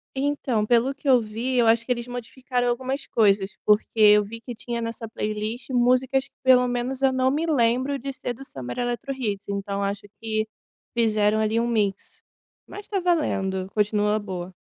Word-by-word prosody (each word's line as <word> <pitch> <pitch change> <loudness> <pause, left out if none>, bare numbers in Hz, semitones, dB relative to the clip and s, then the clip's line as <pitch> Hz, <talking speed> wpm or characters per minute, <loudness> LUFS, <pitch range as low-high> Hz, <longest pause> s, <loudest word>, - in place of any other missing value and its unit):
Então, 265 -6 0
pelo 245 +4 +3
que 280 +1 -10
eu 250 -3 +6
vi, 225 +4 -3
eu 235 - +4
acho 230 0 +3
que - - -3
eles 240 -1 -1
modificaram 245 +1 -3
algumas 260 +3 -2
coisas, 200 -3 +2
porque 210 0 +4
eu 210 -1 +6
vi 230 +3 -9
que 245 0 -7
tinha, 235 +1 -5
nessa 230 0 -5
playlist, 215 +4 -4
músicas, 255 +2 +2
que - - -35
pelo 250 -1 +5
menos 245 +2 -2
eu 265 -1 +3
não 260 0 +2
me 310 +4 0
lembro 260 -1 +1
de 275 +1 -5
ser 260 -2 -5
do 255 +3 -11
Summer 125 - -7
Eletrohits, 240 -4 -3
então 200 0 -3
acho 200 +1 -2 0.2
que 215 -1 -1 0.5
fizeram, 215 -2 +3
ali, 220 +1 +1
um 235 - 0
mix. 210 -4 -2 0.5
Mas 410 - -10
tá 395 -2 0
valendo, 195 - 0
continua 210 0 +1
boa. 185 -3 -6
235 Hz, 180 wpm, -24 LUFS, 210-260 Hz, 0.5 s, eu